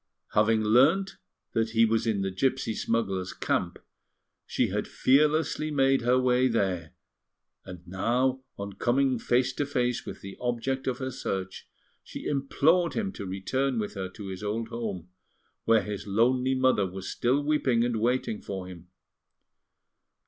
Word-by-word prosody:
Having 110 +1 +3
learnt 150 - +3 0.4
that 115 0 +1
he 115 0 +4
was 115 +1 +1
in 100 -3 +1
the 95 - -2
gipsy 130 +3 0
smugglers' 95 -6 -1
camp, - - -1 0.7
she - - 0
had - - -2
fearlessly 150 +3 +2
made 135 -2 +3
her 125 +2 +3
way 130 0 +3
there; 95 -8 -1 0.7
and 90 -1 -10
now, 125 +8 0 0.2
on 100 0 -6
coming 130 +4 +1
face 125 +2 +1
to 145 - -1
face 125 -4 -1
with - - -8
the 95 0 -9
object 125 +2 -2
of 125 -1 0
her 130 0 -4
search, 95 -5 -5 0.3
she - - -9
implored 155 +5 +2
him 205 -3 -1
to 100 - -7
return 125 +8 -1
with 105 -2 -2
her 95 -1 -4
to 100 +1 -9
his 95 -1 -6
old 110 +2 -3
home, 105 -7 -5 0.6
where 115 -2 +4
his 105 +1 -6
lonely 125 +5 +2
mother 130 -7 +3
was 95 +1 -7
still 130 +4 +1
weeping 140 -6 +2
and 120 -2 -1
waiting 120 -2 0
for 95 -2 -5
him. 90 -1 -11
120 Hz, 155 wpm, -28 LUFS, 100-130 Hz, 0.7 s, he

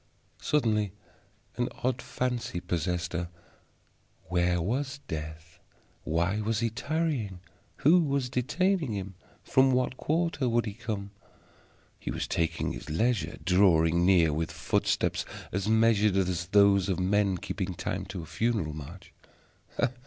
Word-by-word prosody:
Suddenly 105 -9 +1 0.6
an 120 - 0
odd 125 0 0
fancy 125 -5 -2
possessed 90 0 -2
her. 85 0 -2 1.0
Where 90 -1 +2
was 130 - -2
Death? 80 0 -7 0.5
Why 85 +6 0
was 110 0 0
he 115 -1 0
tarrying? 130 - -2 0.5
Who 170 +5 +7
was 140 -5 0
detaining 150 - 0
him? 100 -1 -4 0.3
From 130 0 +4
what 125 0 0
quarter 160 -5 0
would 120 0 +2
he 105 - -4
come? 105 -3 -5 0.9
He - - -6
was - - -3
taking 85 0 -1
his - - -8
leisure, 110 +8 0
drawing 85 -3 +4
near 90 -4 +4
with 80 +2 -1
footsteps - - 0 0.3
as 95 +2 -2
measured 110 -2 +4
as 90 -2 0
those 100 0 +4
of 95 - 0
men 95 0 +2
keeping 95 0 -4
time - - -3
to 90 - -6
a - - -8
funeral 80 0 -1
march. 80 +5 -10
100 Hz, 130 wpm, -29 LUFS, 90-125 Hz, 1.0 s, Who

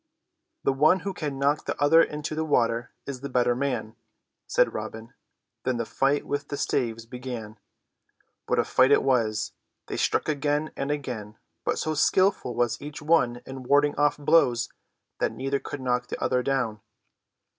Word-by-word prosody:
"The 135 - +2
one 155 +7 +4
who 195 - -3
can 145 -6 -4
knock 140 +2 +1
the - - -3
other 155 +3 +6
into 150 0 -2
the 160 +1 -1
water 120 -5 +1 0.2
is 135 -3 -6
the 140 - -5
better 125 -1 +2
man," 120 -4 -2 0.5
said - - +2
Robin. 110 +1 -6 0.5
Then 130 -1 0
the 115 - -2
fight 140 +5 +1
with 145 0 -3
the 145 - -4
staves 115 -5 -1
began. 120 -3 -7 0.9
What - - +1
a - - +4
fight 130 +1 +4
it 145 - +5
was! 115 -5 +1 0.3
They - - -5
struck - - +1
again 150 +1 0
and 140 - -3
again, 120 -8 -4 0.3
but - - 0
so 155 - -1
skilful 185 - +2
was 120 -1 0
each 145 +1 -7
one 140 -6 +2
in 135 0 -7
warding 145 +3 +3
off 145 0 +2
blows 130 -6 +3 0.5
that - - 0
neither 135 +1 -1
could 145 - -7
knock 125 -1 0
the - - -5
other 125 0 +1
down. 125 -5 -1
135 Hz, 170 wpm, -26 LUFS, 120-145 Hz, 0.9 s, other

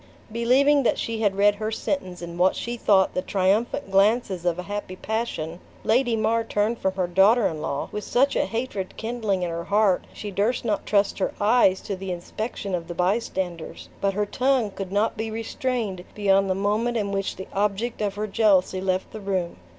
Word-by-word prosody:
Believing 260 +6 +4
that 245 - +1
she 225 -1 -3
had 205 -3 +2
read 205 +1 +4
her 215 +1 -3
sentence 185 -7 -3
in 170 0 -7
what 185 +1 +4
she 240 +1 -4
thought 195 -5 +3
the 185 - 0
triumphant 195 +2 0
glances 195 -2 +2
of 175 -1 +1
a 180 - -4
happy 205 -1 -5
passion, 185 -6 -3 0.2
Lady 240 0 +2
Mar 230 +1 +1
turned 225 +1 0
from 190 0 -1
her 185 -1 +1
daughter 195 +6 +4
in 155 -2 -1
law 140 -3 -2
with 210 - -4
such 275 +3 +2
a - - +2
hatred 225 -5 -4
kindling 220 -5 -1
in 175 - -2
her 170 0 -4
heart, 205 -2 +2
she 205 - -7
durst 215 +6 0
not 215 -3 -1
trust 200 -1 +2
her 190 - -1
eyes 205 -3 +4
to 200 - -4
the 190 0 -5
inspection 195 +3 -5
of 170 -2 -2
the 175 - -6
bystanders; 180 -3 -2
but 195 -1 +1
her 210 0 +1
tongue 250 -1 +1
could 195 -1 -6
not 210 +3 +1
be 220 +1 -3
restrained 225 -3 -3
beyond 195 -1 +3
the 185 - +1
moment 215 +5 0
in 200 -2 -1
which 195 -1 -2
the 190 - -7
object 210 +4 -1
of 200 -2 -1
her 210 +1 -2
jealousy 195 -3 +2
left 185 0 -1
the 215 - -8
room. 190 -3 -2
205 Hz, 200 wpm, -24 LUFS, 190-225 Hz, 0.2 s, Believing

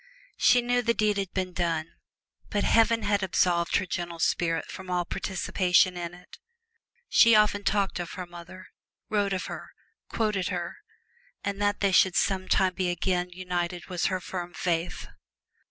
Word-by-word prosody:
She 245 -1 +5
knew 245 0 +1
the 235 -1 +1
deed 210 -1 +1
had 195 -2 -2
been 185 -1 -3
done, 165 -2 -2 0.6
but 205 - 0
Heaven 230 0 +3
had 205 -1 +1
absolved 175 -2 +1
her 190 - +2
gentle 175 -2 -4
spirit 165 -1 0
from 190 -1 -9
all 180 -1 0
participation 180 0 +1
in 175 -1 -5
it. 180 - -16 0.7
She 230 -1 +6
often 210 -1 +3
talked 200 -2 0
of 175 - -5
her 180 -1 -5
mother, 175 +2 -12 0.4
wrote 205 -2 +1
of 190 -1 -2
her, - - -8 0.4
quoted 210 -5 0
her, 175 -3 -4 0.7
and 200 0 -3
that 205 0 +1
they 200 -1 +3
should 185 -1 +4
sometime 190 -1 +2
be 185 -1 -1
again 180 0 -1
united 180 -1 -4
was 180 -2 -1
her 185 -1 -1
firm 175 -1 -6
faith. 170 -1 -2
185 Hz, 160 wpm, -27 LUFS, 175-200 Hz, 0.7 s, She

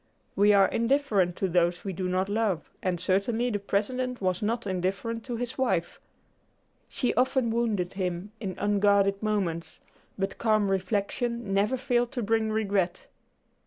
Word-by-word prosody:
We 205 +1 +5
are 200 -1 +6
indifferent 230 -8 +1
to 190 - -1
those 175 0 +1
we 195 - -2
do 180 +1 -3
not 185 +1 0
love, 205 -5 -1
and 180 -2 -1
certainly 210 +7 +1
the 205 - -1
President 250 +6 -1
was 185 -2 -1
not 230 +2 -1
indifferent 195 +5 -2
to 245 -2 -3
his 245 +2 -5
wife. 190 -10 0 0.9
She 250 - 0
often 255 -2 +2
wounded 220 -6 0
him 185 0 -3
in 190 -5 -4
unguarded 200 -1 +2
moments, 195 -6 -2 0.4
but 195 0 -3
calm 215 -3 +2
reflection 205 +3 -1
never 210 +6 +2
failed 245 -2 0
to 245 - -2
bring 220 +1 +1
regret. 200 -4 0
205 Hz, 150 wpm, -27 LUFS, 190-235 Hz, 0.9 s, are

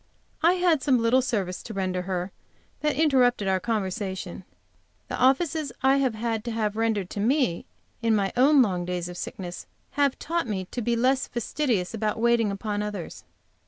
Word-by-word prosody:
I 335 +2 +5
had 355 -5 +2
some 265 -3 +3
little 230 +3 +3
service 200 -8 -2
to 220 - -8
render 185 -2 -1
her 180 0 -3 0.5
which 300 -2 0
interrupted 255 -9 +3
our 190 -1 +2
conversation. 190 -3 -3 0.6
The - - -2
offices 295 +2 +2
I 270 +1 +5
have 260 -5 +1
had 225 -1 -2
to 235 - -2
have 215 -2 -1
rendered 220 -4 -1
me 220 - +1 0.3
in 230 -1 +3
my 195 -2 0
own 270 +2 +6
long 180 -5 -1
days 175 0 -3
of 175 - -8
sickness 180 -1 -6 0.2
have 285 -2 +1
taught 335 -3 -2
me 190 -4 -2
to 245 - -3
be 235 +1 +1
less 260 +3 +2
fastidious 235 -5 -1
about 215 -1 -1
waiting 235 -2 +3
upon 205 +1 -3
others. 210 -5 -6
225 Hz, 170 wpm, -26 LUFS, 195-260 Hz, 0.6 s, own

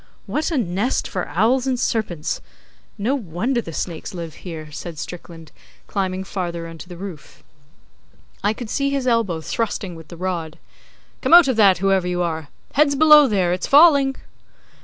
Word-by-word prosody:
'What 310 - -1
a 325 - -1
nest 205 +2 -1
for 180 - -4
owls 240 +8 +1
and 255 -2 0
serpents! 195 -10 -2 0.6
No 220 +6 0
wonder 235 - -1
the 165 - -8
snakes 170 +4 -5
live 165 -3 -6
here,' 155 -4 -8
said 165 +2 -7
Strickland, 165 -1 -9 0.3
climbing 190 -1 -2
farther 175 -3 -4
into 165 +2 -10
the 175 - -9
roof. 180 -5 -10 1.0
I 205 - +3
could 225 -1 -7
see 275 0 0
his 275 -2 -1
elbow 225 -9 +1
thrusting 205 0 -3
with 160 -2 -12
the 170 - -11
rod. 170 -3 -4 0.6
'Come - - +6
out 345 -4 +8
of 260 - +1
that, 200 -4 +6
whoever 190 -1 +1
you 180 0 -1
are! 160 -3 -3 0.3
Heads 285 0 +3
below 300 -1 +7
there! 185 -6 +1
It's 180 - -3
falling. 280 -3 +6
190 Hz, 165 wpm, -21 LUFS, 170-250 Hz, 1.0 s, out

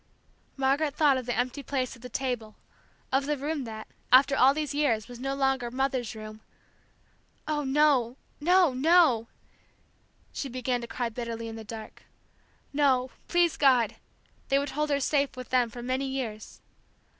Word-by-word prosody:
Margaret 275 +2 +1
thought 290 -4 +4
of 255 -2 -5
the 245 - -1
empty 255 +3 -1
place 260 -1 -2
at 235 - -18
the 250 - -8
table, 245 -4 -3 0.6
of 270 +1 +1
the 295 0 0
room 290 0 -3
that, 220 -1 -7 0.3
after 270 +2 +6
all 265 0 +6
these 300 -2 -2
years, 265 -7 +1
was 245 -1 -10
no 270 +1 -2
longer 270 -3 0
"Mother's 255 -2 -2
room 215 0 -9 0.5
" - - -39
Oh, 300 -1 -1
no 270 -3 +2 0.2
no 350 -1 +4
no! 275 -5 +4 1.1
She 275 - -4
began 250 0 -2
to 235 - -6
cry 235 +1 -3
bitterly 230 0 -5
in 225 - -7
the 225 - -8
dark. 220 0 -9 0.7
No, 265 -3 +2 0.2
please 345 -2 +2
God, 250 -6 +3 0.5
they 275 - +4
would 280 0 -1
hold 300 0 -1
her 285 -1 +1
safe 280 -1 0
with 255 - -8
them 250 -2 +3
for 240 +2 -9
many 260 +2 -1
years. 240 -5 -5
260 Hz, 165 wpm, -28 LUFS, 240-285 Hz, 1.1 s, after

